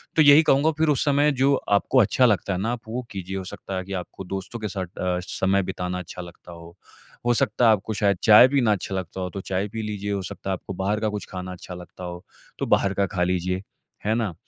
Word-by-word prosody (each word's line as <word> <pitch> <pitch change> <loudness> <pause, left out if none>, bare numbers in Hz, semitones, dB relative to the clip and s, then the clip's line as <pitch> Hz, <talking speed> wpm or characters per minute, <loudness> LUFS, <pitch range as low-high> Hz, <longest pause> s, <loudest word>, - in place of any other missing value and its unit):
तो 160 - +5
यही 145 +2 +8
कहूँगा 150 +3 +3
फ़िर 160 0 +2
उस 145 0 +2
समय 145 +1 +3
जो 135 +2 +4 0.2
आपको 100 +6 +2
अच्छा 125 +3 +4
लगता 100 -4 +2
है 90 - -2
ना 115 +3 0
आप 120 -2 -4
वो 120 +3 -3
कीजिए। 95 -1 -5
हो 95 - -4
सकता 95 0 -6
है 95 - -3
कि 100 - -7
आपको 95 +1 -6
दोस्तों 95 +5 -5
के 110 - -3
साथ 95 -2 -4
अ, 90 -1 -1
समय 95 +1 +1
बिताना 90 0 -3
अच्छा 90 0 -8
लगता 85 0 -12
हो। 85 0 -12 0.5
हो 120 - +4
सकता 115 +2 +2
है 115 - +7
आपको 110 +1 0
शायद 100 -2 +1
चाय 110 +3 +9
पीना 130 -5 +2
अच्छा 95 -1 -2
लगता 95 0 -4
हो 90 - -3
तो 100 - -4
चाय 95 +2 -2
पी 110 +1 -5
लीजिए। 105 -1 -4
हो 100 -1 -1
सकता 95 - -6
है - - +1
आपको 95 +1 -6
बाहर 100 +3 -1
का 110 -1 0
कुछ 105 -1 -5
खाना 90 0 -5
अच्छा 90 0 -9
लगता 90 +1 -11
हो 90 0 -7 0.4
तो - - -1
बाहर 100 0 +2
का 100 0 +1
खा 90 - +2
लीजिए। 90 +1 -1 0.4
है 110 - +2
ना? 110 -7 -1
100 Hz, 255 wpm, -24 LUFS, 90-110 Hz, 0.5 s, चाय